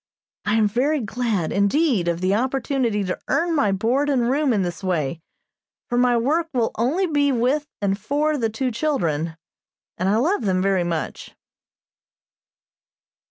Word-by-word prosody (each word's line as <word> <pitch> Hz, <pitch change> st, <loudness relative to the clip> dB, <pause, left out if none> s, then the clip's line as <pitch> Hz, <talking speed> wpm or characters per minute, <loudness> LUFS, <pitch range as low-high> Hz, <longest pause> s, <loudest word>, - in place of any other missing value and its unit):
I 215 Hz, -, +1 dB
am 220 Hz, -2 st, +4 dB
very 270 Hz, +8 st, +1 dB
glad, 220 Hz, -6 st, -2 dB
indeed, 200 Hz, -, +2 dB
of 170 Hz, 0 st, -1 dB
the 185 Hz, +1 st, +2 dB
opportunity 250 Hz, -2 st, 0 dB
to 185 Hz, -1 st, -3 dB
earn 340 Hz, 0 st, +1 dB
my 250 Hz, -10 st, +2 dB
board 240 Hz, +9 st, +1 dB
and 250 Hz, -3 st, +2 dB
room 285 Hz, 0 st, +2 dB
in 205 Hz, -5 st, +1 dB
this 175 Hz, +1 st, -5 dB
way, 165 Hz, -4 st, -1 dB, 0.7 s
for 240 Hz, -, -1 dB
my 245 Hz, 0 st, +3 dB
work 310 Hz, +8 st, +1 dB
will 235 Hz, -2 st, +1 dB
only 280 Hz, -, +1 dB
be 290 Hz, -4 st, +2 dB
with 265 Hz, +5 st, +1 dB, 0.2 s
and 195 Hz, -1 st, +2 dB
for 295 Hz, +7 st, 0 dB
the 230 Hz, -6 st, 0 dB
two 250 Hz, +4 st, -2 dB
children, 170 Hz, -, -1 dB, 0.6 s
and 185 Hz, +2 st, +1 dB
I 205 Hz, -, +3 dB
love 295 Hz, -, +1 dB
them 190 Hz, -4 st, +1 dB
very 190 Hz, -1 st, +2 dB
much. 170 Hz, -2 st, -4 dB
235 Hz, 160 wpm, -22 LUFS, 195-280 Hz, 0.7 s, am